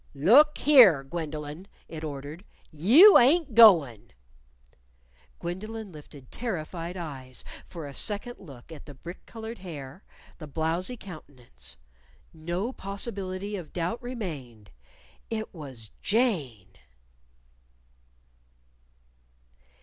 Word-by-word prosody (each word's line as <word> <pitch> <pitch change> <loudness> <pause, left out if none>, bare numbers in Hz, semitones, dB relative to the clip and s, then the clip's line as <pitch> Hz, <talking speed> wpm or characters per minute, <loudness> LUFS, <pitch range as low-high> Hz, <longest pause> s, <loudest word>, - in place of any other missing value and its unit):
"Look 255 - +5
here, 230 - +7
Gwendolyn!" 155 +3 -6 0.2
it 160 -1 -8
ordered. 145 +3 -7 0.3
"You 240 - +8
ain't 285 +2 +4
goin'!" 165 - +6 1.2
Gwendolyn 210 +4 -6
lifted 145 -4 -14
terrified 175 -5 -5
eyes 135 -7 -8 0.2
for 165 -4 -8
a 140 - -8
second 210 - -4
look 140 -6 -14
at 160 -1 -11
the 145 - -11
brick 175 +7 -10
colored 225 0 -8
hair, 155 -2 -9 0.4
the 155 - -8
blowzy 165 - -2
countenance. 125 - -12 0.6
No 175 +9 -4
possibility 195 -1 -4
of 175 -6 -8
doubt 175 +6 -3
remained! 155 - -7 0.6
It 220 -1 -4
was 130 - -10
Jane! 140 - -1
170 Hz, 95 wpm, -27 LUFS, 145-215 Hz, 1.2 s, You